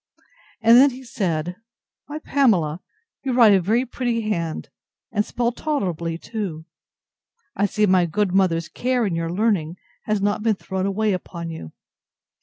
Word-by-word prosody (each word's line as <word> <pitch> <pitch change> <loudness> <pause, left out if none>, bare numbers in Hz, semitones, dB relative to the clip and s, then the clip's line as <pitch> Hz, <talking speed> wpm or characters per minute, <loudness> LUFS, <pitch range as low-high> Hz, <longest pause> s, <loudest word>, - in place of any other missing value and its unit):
And 230 +1 +7
then 280 +2 +7
he 260 0 -10
said, 180 -7 -2 0.5
Why, 295 - -5
Pamela, 195 - +1 0.4
you 265 -2 -2
write 230 -4 +7
a 190 - +4
very 225 +8 +1
pretty 240 -2 -2
hand, 170 -7 -3 0.4
and 210 -1 +1
spell 240 +2 -1
tolerably 180 - -2
too. 175 -6 -5 0.9
I 205 - +2
see 210 +1 +1
my 185 -3 +3
good 200 +2 0
mother's 170 -4 +2
care 250 -1 0
in 195 - -1
your 165 0 -2
learning 180 -4 0 0.3
has 215 -1 0
not 205 +1 0
been 220 -1 +2
thrown 190 0 -3
away 210 +1 0
upon 170 -2 -5
you. 120 - -8
200 Hz, 155 wpm, -22 LUFS, 170-230 Hz, 0.9 s, And